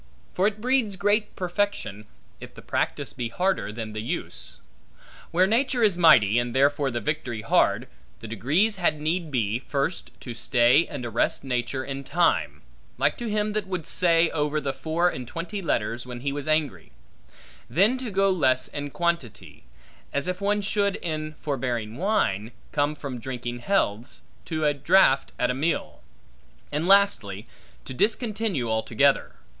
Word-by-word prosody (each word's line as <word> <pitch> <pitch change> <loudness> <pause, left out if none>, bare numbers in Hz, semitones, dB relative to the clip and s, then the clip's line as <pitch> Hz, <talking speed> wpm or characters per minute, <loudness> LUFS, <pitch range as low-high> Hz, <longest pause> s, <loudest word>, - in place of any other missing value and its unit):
For 190 +2 +2
it 215 0 -3
breeds 245 -3 +1
great 205 +2 +1
perfection, 180 - -2 0.3
if - - -11
the - - -12
practice - - -2
be 120 -2 -4
harder 185 - 0
than 110 -1 -6
the 110 - -4
use. 115 - -5 0.7
Where 180 +2 +3
nature 240 +4 +1
is 205 -4 +4
mighty, 120 - +6
and 120 0 -3
therefore 140 +1 +3
the 120 -2 -2
victory 120 -3 -3
hard, 115 - +2 0.3
the 115 - -8
degrees 155 - +1
had 160 -4 +1
need 160 +2 -1
be, 115 -4 0
first 140 +5 -2
to 120 - -6
stay 120 +5 +3
and 140 -6 -6
arrest 115 +3 0
nature 130 0 -2
in 135 0 -5
time; 170 +4 +1 0.3
like - - +2
to 240 -2 -3
him 210 0 0
that 210 -2 -1
would 180 -4 -3
say 170 -1 +3
over 150 0 0
the 140 -2 -2
four 165 +4 0
and 130 -8 -3
twenty 180 - -5
letters 120 - -1
when 120 -1 -7
he 140 +1 -1
was 145 0 -5
angry; 150 - 0 0.8
then 200 - +3
to 255 -3 -4
go 195 0 +2
less 130 -8 +2
in 145 0 -5
quantity; 170 - -3 0.5
as 140 +4 0
if 180 +1 -3
one 205 +1 +1
should, 200 -1 +1
in 155 -2 -4
forbearing 120 -6 -2
wine, 120 - 0 0.2
come 145 +1 0
from 135 -4 -6
drinking 120 0 -5
healths, 120 - 0 0.2
to 155 -2 -2
a 145 - +3
draught 140 -1 +3
at 125 0 +1
a - - -1
meal; 155 +6 -2 0.7
and 150 +4 -1
lastly, 120 - +3 0.4
to 130 - -6
discontinue 210 - 0
altogether. 110 +5 +1
150 Hz, 160 wpm, -25 LUFS, 120-190 Hz, 0.8 s, mighty